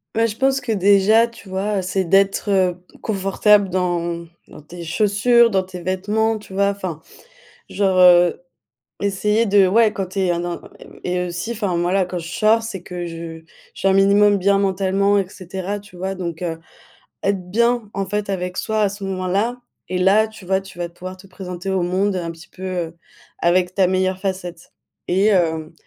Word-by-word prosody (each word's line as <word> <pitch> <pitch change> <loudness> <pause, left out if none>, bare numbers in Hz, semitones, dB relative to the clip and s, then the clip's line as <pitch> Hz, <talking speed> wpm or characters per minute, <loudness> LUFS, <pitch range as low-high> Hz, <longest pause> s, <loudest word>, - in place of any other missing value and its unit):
Ouais 225 +1 +3
je 215 -1 -6
pense 270 0 +2
que 240 - -3
déjà 205 +3 +4
tu 230 -4 -15
vois, 195 +2 -1
heu, - - -1
c'est 185 +1 -1
d'être 195 0 +2 0.2
confortable 205 0 +2
dans 175 -2 -1 0.2
dans - - -13
tes 170 +4 -11
chaussures, 215 +7 +3
dans 190 -3 +1
tes 185 -1 -9
vêtements 210 +5 0
tu 210 -2 -13
vois? 200 +1 +2
Enfin, 185 -6 -5 0.7
genre, 190 -2 +2
heu, 175 -1 +6 0.6
essayer 210 +3 +1
de 200 -2 +5
ouais 220 +2 +4
quand 195 - -3
tu 190 +2 -7
es 185 -2 +2
un 170 - -1
dans 175 0 -4 0.2
et - - -11
b - - -16
et 180 0 -1
aussi 180 +6 -4
enfin 205 -6 -2
moi 175 +1 0
là 195 -1 +3
quand 180 0 -5
je 165 -1 -7
sors, 215 +5 +2
c'est 195 -6 -6
que 180 -1 -6
je 165 -1 -7
je 160 - -22
suis - - -2
un 195 - +5
minimum 200 +1 +5
bien 200 +1 +2
mentalement, 195 +1 +1
et 195 -2 0
cetera, 190 +1 -5
tu 205 -2 -15
vois? 190 +2 -4
Donc, 170 -2 -5
heu, 165 -2 -3 0.7
être 190 -2 -1
bien 235 +1 +1
en 195 - -2
fait 205 +1 -3
avec 180 -1 -3
soi 220 0 -1
à 205 - +3
ce 200 0 -7
moment 185 -1 -3
là, 225 +7 -1 0.3
et 185 - -2
là, 195 +4 +4
tu 220 -3 -14
vois, 190 +1 +1
tu 195 -2 -13
vas 175 0 -3
pouvoir 185 +2 -9
te 185 +1 -16
présenter 185 0 -7
au 190 -1 +1
monde 185 +3 0
un 170 -2 -3
petit 165 +3 -14
peu, 190 - -12
heu, 175 -3 -4 0.4
avec 180 +1 +2
ta 190 -1 +3
meilleure 185 0 0
facette. 185 -3 -5 0.4
Et 190 +3 +2
hem, 160 -5 +1
190 Hz, 200 wpm, -20 LUFS, 180-205 Hz, 0.7 s, heu